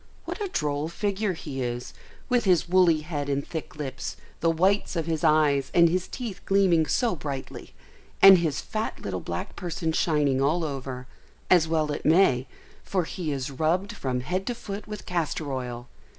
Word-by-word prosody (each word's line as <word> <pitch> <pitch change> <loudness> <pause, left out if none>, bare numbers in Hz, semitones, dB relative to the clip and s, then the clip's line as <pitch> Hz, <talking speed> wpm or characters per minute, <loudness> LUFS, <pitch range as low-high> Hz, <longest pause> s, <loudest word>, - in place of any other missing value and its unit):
What - - -5
a 410 - 0
droll 150 - -1
figure 200 +2 -1
he 145 -5 -6
is, 120 0 -4 0.3
with 245 -2 +2
his 180 -3 +3
woolly 175 -3 +4
head 150 -3 -4
and 140 0 -1
thick 160 -2 -6
lips, 135 -3 -5 0.2
the 165 - +2
whites 190 +5 +2
of 165 -2 -1
his 160 -1 -2
eyes 150 -3 +3
and 170 -1 +7
his 180 +2 -1
teeth 225 -7 -6
gleaming 185 -5 +3
so 235 - +1
brightly, 140 -4 -7 0.4
and 195 -2 +9
his 155 -4 -1
fat 215 0 -4
little - - -4
black - - -5
person 170 -2 -2
shining 150 -5 +2
all 160 +5 +2
over, 135 -4 -5 0.5
as 175 -3 +6
well 155 -2 0
it 145 - -4
may, 150 -6 +4 0.4
for 185 -2 0
he 160 -1 -4
is 135 -1 -3
rubbed 165 +8 0
from 125 -2 -2
head 185 +8 -3
to 245 - -1
foot 205 -3 -7
with 210 -1 -7
castor 165 -3 -2
oil. 120 -2 -5
160 Hz, 180 wpm, -26 LUFS, 145-185 Hz, 0.5 s, and